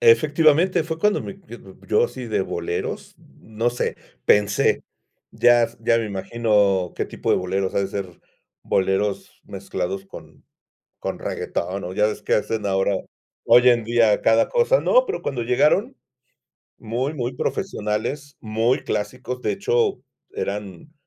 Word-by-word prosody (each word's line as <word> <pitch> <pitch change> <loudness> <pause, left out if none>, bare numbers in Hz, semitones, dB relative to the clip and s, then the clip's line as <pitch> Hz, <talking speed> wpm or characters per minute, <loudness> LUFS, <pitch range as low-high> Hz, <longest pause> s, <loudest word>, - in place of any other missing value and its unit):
Efectivamente, 175 - +4
fue 160 0 -4
cuando 210 +4 +2
me, 195 0 -9
yo 120 - -10
d 95 -1 -15
yo 105 - +3
sí 125 -2 -8
de 110 -4 0
boleros, 85 -1 -4
no 115 +2 -4
sé. 120 - -2 0.3
Pensé, 105 -1 +3 0.5
ya 120 -1 +4
ya 115 - +3
me 115 - -2
imagino 100 -2 +1
qué - - -1
tipo - - -3
de - - +4
boleros, 95 +1 -2
ha - - +2
de 100 - -1
ser 95 -3 -6 0.4
boleros 95 +1 -1
mezclados 95 +2 -4
con - - -13 0.6
con - - -4
reguetón. 95 +3 -3
O 90 - -5
ya 105 +2 +3
ves 105 -1 -4
que - - -1
hacen 110 0 -1
ahora, 95 0 +1 0.5
hoy 125 +1 +7
en 120 -2 +3
día 115 -2 +3
cada 115 0 +4
cosa. - - +3
No, - - +4
pero 415 - -4
cuando 125 -3 -3
llegaron 155 - +2 0.8
muy, 125 +6 -3
muy 125 -4 -3
profesionales, 135 - -3
muy 115 +3 0
clásicos. 125 +3 -4
De - - 0
hecho 410 - 0 0.3
eran, 100 - -5
115 Hz, 150 wpm, -22 LUFS, 100-140 Hz, 0.8 s, hoy